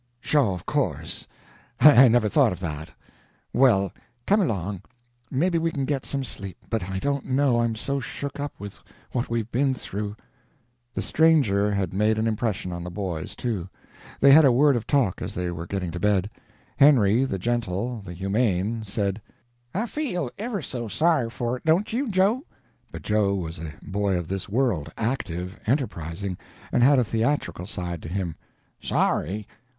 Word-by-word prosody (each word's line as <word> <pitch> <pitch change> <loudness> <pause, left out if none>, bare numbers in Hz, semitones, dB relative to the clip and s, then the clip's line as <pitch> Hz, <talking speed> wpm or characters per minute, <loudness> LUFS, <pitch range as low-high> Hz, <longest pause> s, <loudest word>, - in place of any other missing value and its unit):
"Sho, 135 -4 +2
of 90 - -9
course; - - -2 0.5
I 135 -1 +9
never 115 -2 +3
thought 100 - +4
of 90 - -5
that. 80 -3 -5 0.6
Well, 105 -8 +4 0.3
come 205 +2 +4
along, 100 - -2 0.5
maybe 165 +5 +1
we 165 0 +1
can 140 -4 -2
get 135 -1 -2
some 140 -1 -1
sleep, 100 -7 -4
but 110 -5 -1
I 95 - -3
don't 140 +6 -1
know, 130 -2 +2
I'm 115 -1 0
so 140 +5 -2
shook 140 +2 -5
up 145 0 -5
with 100 -1 -8 0.3
what 125 -1 -2
we've 115 -1 -2
been 135 +2 +1
through." 105 -3 -5 0.8
The - - -1
stranger 135 -11 +3
had 100 -4 -1
made 105 +3 +2
an 110 - 0
impression 110 -4 -1
on 85 0 -5
the 90 - -5
boys, 90 -4 -4
too. 100 -7 -3 0.5
They 140 - +7
had 155 +3 +9
a 135 - +6
word 140 +3 +4
of 115 - -3
talk 125 -10 +1
as 95 +3 -5
they 90 0 -2
were 85 0 -6
getting 90 -3 -3
to 85 - -5
bed. 105 +1 +1 0.5
Henry, 125 -5 +5
the 130 -8 -1
gentle, 115 +2 -2
the 90 -3 -8
humane, 100 +3 0
said: 100 -1 -2 0.5
"I 215 +6 -1
feel 215 - -3
ever 215 -5 -3
so 120 -4 -4
sorry 155 0 +2
for 120 +1 -2
it, - - -16
don't 170 +7 +2
you, 255 +2 0
Joe?" 200 +6 +2 0.5
But - - -8
Joe 105 -2 +2
was 80 -4 -5
a 80 -1 -6
boy 100 -1 0
of 85 -2 -5
this 95 0 -4
world, 110 - 0
active, 100 -6 -3
enterprising, 100 - -2 0.3
and - - +2
had 140 +3 +6
a 125 - +4
theatrical 115 -4 -1
side 90 -4 -4
to - - -7
him: 90 -3 -3 0.4
"Sorry? 105 +6 0
110 Hz, 175 wpm, -25 LUFS, 95-135 Hz, 0.8 s, I